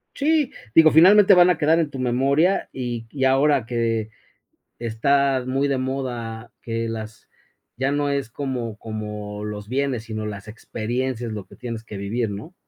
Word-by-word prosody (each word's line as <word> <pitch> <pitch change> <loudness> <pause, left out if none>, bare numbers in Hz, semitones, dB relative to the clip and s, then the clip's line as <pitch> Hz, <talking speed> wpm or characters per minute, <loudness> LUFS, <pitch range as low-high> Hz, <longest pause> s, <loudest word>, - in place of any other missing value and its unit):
Sí, 300 -1 +1 0.2
digo, 160 -1 +8
finalmente 195 +6 +7
van 180 -1 +7
a 180 - +2
quedar 160 +1 +3
en 160 - 0
tu 135 - -8
memoria, 135 +8 +1
y 120 -3 -5
y 135 +2 -3
ahora 135 -1 +3
que 115 -2 -1 0.7
está 130 +3 +1
muy 135 +2 0
de 140 - +1
moda 120 -4 -4
que 115 0 -3
las 110 -1 -7 0.5
ya 135 +2 0
no 145 0 0
es 140 -4 -2
como 120 -5 -4
como 105 -1 -6
los 105 0 -6
bienes, 130 -3 -1
sino 110 -1 -5
las 100 -1 -7
experiencias, 120 +2 -4
lo 105 -3 -6
que - - -16
tienes 115 -2 -6
que 105 -3 -8
vivir, 110 +2 -2
¿no? 105 - -8
125 Hz, 165 wpm, -23 LUFS, 110-140 Hz, 0.7 s, digo